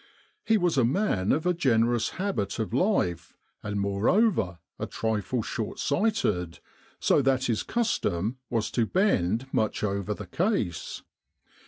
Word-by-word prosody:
He 225 Hz, -1 st, +3 dB
was 175 Hz, -7 st, +2 dB
a -, -, +4 dB
man 115 Hz, -, +1 dB
of 155 Hz, +3 st, +1 dB
a 180 Hz, -, +3 dB
generous 120 Hz, -7 st, +2 dB
habit 185 Hz, -, -2 dB
of 110 Hz, -1 st, -3 dB
life, 120 Hz, -, 0 dB, 0.2 s
and 105 Hz, -1 st, -3 dB
moreover 100 Hz, -, +2 dB, 0.2 s
a -, -, -3 dB
trifle 110 Hz, +2 st, -1 dB
short 110 Hz, 0 st, -4 dB
sighted, 140 Hz, -, 0 dB, 0.4 s
so -, -, +3 dB
that 130 Hz, -1 st, +2 dB
his 115 Hz, -4 st, 0 dB
custom 130 Hz, -, -1 dB
was 115 Hz, -3 st, -1 dB
to 115 Hz, -3 st, +1 dB
bend 125 Hz, -, +1 dB
much 110 Hz, -1 st, 0 dB
over 100 Hz, 0 st, -1 dB
the 105 Hz, -, -8 dB
case. 160 Hz, -, -2 dB
115 Hz, 140 wpm, -27 LUFS, -, 0.4 s, a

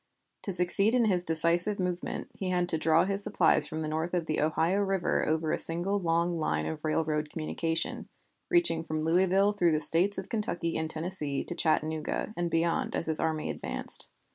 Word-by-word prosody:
To 200 Hz, -, -3 dB
succeed 185 Hz, +5 st, +4 dB
in 240 Hz, -2 st, +3 dB
his 185 Hz, -4 st, +1 dB
decisive 170 Hz, +5 st, +2 dB
movement 180 Hz, -1 st, -4 dB
he 190 Hz, -, -5 dB
had 180 Hz, -1 st, 0 dB
to 160 Hz, -, +4 dB
draw 160 Hz, +2 st, +3 dB
his 200 Hz, +1 st, 0 dB
supplies 160 Hz, -6 st, +4 dB
from 160 Hz, 0 st, -5 dB
north 160 Hz, +3 st, -3 dB
of 170 Hz, -2 st, -1 dB
the 155 Hz, -, -2 dB
Ohio 160 Hz, +5 st, +1 dB
River 195 Hz, -3 st, 0 dB
over 155 Hz, 0 st, -1 dB
a -, -, -1 dB
single 175 Hz, +5 st, +1 dB
long 170 Hz, -1 st, 0 dB
line 80 Hz, -, -1 dB
of 80 Hz, 0 st, -6 dB
railroad 155 Hz, -1 st, -1 dB
communication, 165 Hz, +1 st, -3 dB, 0.4 s
reaching 345 Hz, -, +2 dB
from 155 Hz, -1 st, -4 dB
Louisville 190 Hz, +4 st, +2 dB
through 175 Hz, -5 st, +1 dB
the 155 Hz, -, +1 dB
States 170 Hz, +6 st, +2 dB
of 190 Hz, -, -5 dB
Kentucky 175 Hz, -6 st, -2 dB
and 160 Hz, 0 st, -2 dB
Tennessee 155 Hz, -4 st, -2 dB
to -, -, -6 dB
Chattanooga, 155 Hz, +4 st, -1 dB
and 175 Hz, 0 st, -2 dB
beyond 165 Hz, +1 st, -1 dB
as -, -, -2 dB
his 160 Hz, -1 st, +5 dB
army 160 Hz, -1 st, -2 dB
advanced. -, -, -1 dB
165 Hz, 185 wpm, -28 LUFS, 160-185 Hz, 0.4 s, his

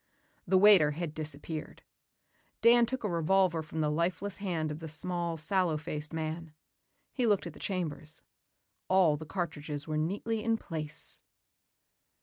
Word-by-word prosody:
The 190 Hz, +2 st, +4 dB
waiter 185 Hz, -7 st, +7 dB
had 165 Hz, 0 st, -4 dB
disappeared. 155 Hz, 0 st, -5 dB, 0.8 s
Dan 235 Hz, 0 st, +6 dB
took 260 Hz, 0 st, -3 dB
a -, -, +1 dB
revolver 175 Hz, 0 st, +2 dB
from 160 Hz, 0 st, -4 dB
the 150 Hz, -1 st, +1 dB
lifeless 180 Hz, +5 st, -1 dB
hand 170 Hz, -6 st, -2 dB
of 150 Hz, -, -5 dB
the 160 Hz, -1 st, -7 dB
small, 170 Hz, +1 st, -2 dB
sallow 170 Hz, 0 st, +1 dB
faced 150 Hz, -1 st, -5 dB
man. 160 Hz, 0 st, -4 dB, 0.6 s
He 250 Hz, -3 st, +1 dB
looked 205 Hz, -4 st, +2 dB
at 170 Hz, -, -6 dB
the -, -, -14 dB
chambers. 160 Hz, -5 st, -4 dB, 0.6 s
All 185 Hz, -5 st, +4 dB
the 155 Hz, +1 st, -8 dB
cartridges 150 Hz, -4 st, -4 dB
were 155 Hz, -1 st, -1 dB
neatly 205 Hz, +7 st, -1 dB
in 230 Hz, -1 st, +2 dB
place. 155 Hz, -4 st, -6 dB
165 Hz, 145 wpm, -31 LUFS, 155-190 Hz, 0.8 s, waiter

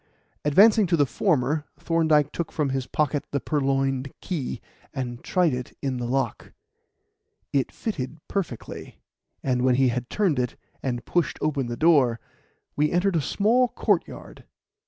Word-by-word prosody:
Advancing 205 Hz, +7 st, +6 dB
to 170 Hz, -1 st, +2 dB
the 145 Hz, -, +4 dB
former, 150 Hz, -2 st, +1 dB
Thorndyke 155 Hz, -3 st, +2 dB
took 170 Hz, -, -4 dB
from 150 Hz, -3 st, 0 dB
his 135 Hz, -1 st, -2 dB
pocket 150 Hz, -1 st, 0 dB
the 140 Hz, -, -1 dB
purloined 135 Hz, -2 st, 0 dB
key, 145 Hz, -9 st, -4 dB, 0.4 s
and 125 Hz, -3 st, -4 dB
tried 175 Hz, -6 st, +2 dB
it 125 Hz, 0 st, -6 dB
in 135 Hz, -2 st, -2 dB
the 120 Hz, -1 st, -3 dB
lock. 130 Hz, -2 st, -2 dB, 1.0 s
It 135 Hz, -2 st, +1 dB
fitted 150 Hz, -, -4 dB
perfectly, 175 Hz, -, -5 dB, 0.5 s
and 125 Hz, -2 st, +1 dB
when 125 Hz, 0 st, +3 dB
he 130 Hz, 0 st, +4 dB
had 125 Hz, 0 st, -3 dB
turned 185 Hz, -10 st, +1 dB
it 125 Hz, -1 st, -1 dB, 0.3 s
and 120 Hz, -3 st, -3 dB
pushed 175 Hz, -2 st, 0 dB
open 140 Hz, -4 st, -1 dB
the 120 Hz, 0 st, -4 dB
door, 140 Hz, -8 st, +4 dB, 0.6 s
we 150 Hz, +1 st, +2 dB
entered 180 Hz, +1 st, +2 dB
a 160 Hz, -, +2 dB
small 230 Hz, -, +2 dB
courtyard. -, -, -2 dB
140 Hz, 150 wpm, -25 LUFS, 130-165 Hz, 1.0 s, Advancing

